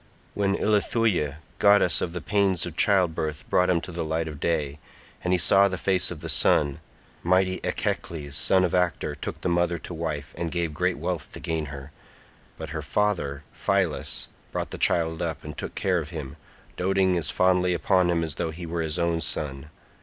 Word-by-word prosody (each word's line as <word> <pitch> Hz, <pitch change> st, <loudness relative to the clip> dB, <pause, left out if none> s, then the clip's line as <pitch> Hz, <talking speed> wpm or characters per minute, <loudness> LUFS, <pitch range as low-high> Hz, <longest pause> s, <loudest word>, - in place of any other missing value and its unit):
When 100 Hz, -1 st, +1 dB
Ilithuia 105 Hz, -, +1 dB, 0.2 s
goddess 100 Hz, -4 st, +5 dB
of 85 Hz, -, -1 dB
the 90 Hz, -, -5 dB
pains 100 Hz, -3 st, +1 dB
of 85 Hz, -2 st, -7 dB
childbirth 80 Hz, -7 st, +1 dB
brought 90 Hz, -, +4 dB
him 90 Hz, -2 st, +3 dB
to 90 Hz, -, -7 dB
the 85 Hz, 0 st, -3 dB
light 80 Hz, +1 st, -1 dB
of 75 Hz, -2 st, -7 dB
day, 75 Hz, -3 st, -1 dB, 0.4 s
and 90 Hz, -, 0 dB
he 90 Hz, -, +4 dB
saw 95 Hz, +6 st, +5 dB
the 95 Hz, -1 st, -3 dB
face 90 Hz, 0 st, +1 dB
of 80 Hz, -4 st, -7 dB
the -, -, -5 dB
sun, 70 Hz, -2 st, +3 dB, 0.4 s
mighty 95 Hz, +1 st, +2 dB
Echecles 75 Hz, -4 st, -2 dB
son 95 Hz, +6 st, +3 dB
of 85 Hz, -, -2 dB
Actor 90 Hz, -2 st, +1 dB
took -, -, -6 dB
the -, -, -1 dB
mother 85 Hz, 0 st, +1 dB
to 85 Hz, -, -8 dB
wife, 80 Hz, -3 st, -4 dB
and 85 Hz, -, -1 dB
gave 85 Hz, -3 st, -1 dB
great 90 Hz, +3 st, 0 dB
wealth 85 Hz, -4 st, -3 dB
to -, -, -7 dB
gain 80 Hz, -2 st, -2 dB
her, 70 Hz, 0 st, -9 dB, 0.7 s
but -, -, -7 dB
her -, -, -3 dB
father 85 Hz, -9 st, -1 dB
Phylas 75 Hz, -8 st, -1 dB, 0.2 s
brought -, -, -3 dB
the -, -, -6 dB
child 80 Hz, -1 st, +2 dB
up, 80 Hz, -2 st, -3 dB
and 75 Hz, 0 st, -7 dB
took -, -, -6 dB
care 95 Hz, -3 st, +1 dB
of 80 Hz, -2 st, -6 dB
him, 75 Hz, -6 st, -6 dB, 0.4 s
doting 95 Hz, 0 st, +2 dB
as 85 Hz, -3 st, +2 dB
fondly 90 Hz, -1 st, +3 dB
upon 90 Hz, 0 st, +2 dB
him 85 Hz, -1 st, +1 dB
as 80 Hz, -2 st, -3 dB
though 85 Hz, -, 0 dB
he 85 Hz, +2 st, -7 dB
were 85 Hz, 0 st, -2 dB
his 80 Hz, 0 st, -2 dB
own 85 Hz, -1 st, +1 dB
son. 75 Hz, -2 st, -2 dB
85 Hz, 195 wpm, -26 LUFS, 80-90 Hz, 0.7 s, goddess